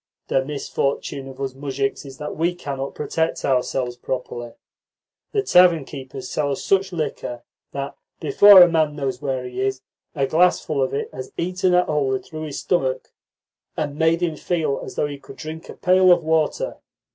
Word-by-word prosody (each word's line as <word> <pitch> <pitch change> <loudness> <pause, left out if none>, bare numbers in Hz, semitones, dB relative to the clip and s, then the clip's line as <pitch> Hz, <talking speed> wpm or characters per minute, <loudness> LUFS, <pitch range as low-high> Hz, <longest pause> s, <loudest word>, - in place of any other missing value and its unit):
The 135 - +2
misfortune 140 -1 -3
of 135 0 -11
us 135 -1 -3
muzhiks 135 0 -3
is 135 -1 -10
that 150 - -5
we 170 +2 0
cannot 140 -5 -5
protect 160 +2 -1
ourselves 125 -2 0
properly. 120 -1 -5 0.8
The 410 -2 +1
tavern 180 - +5
keepers 130 -2 -8
sell 145 +2 -1
us 135 - -3
such 195 0 +2
liquor 150 -7 -4 0.3
that, 140 0 -5 0.2
before 200 -3 +8
a - - +6
man 160 -3 +1
knows 135 -3 -3
where 130 -2 -2
he 125 +1 -5
is, 130 0 -1 0.3
a 140 -2 +1
glassful 155 -1 +2
of 130 -1 +1
it - - -4
has 130 0 -7
eaten 180 +1 +1
a 180 - +4
hole 140 -3 +1
through 155 +3 -8
his 145 -2 -6
stomach, 130 -7 -1 0.7
and 145 -2 -2
made 160 +2 +2
him 165 -3 -1
feel 160 -6 -1
as - - -8
though - - +1
he 145 -1 -6
could 135 - -13
drink 160 +1 -8
a - - -8
pail 185 0 +4
of 175 -1 +4
water. 160 - 0
145 Hz, 180 wpm, -22 LUFS, 135-165 Hz, 0.8 s, before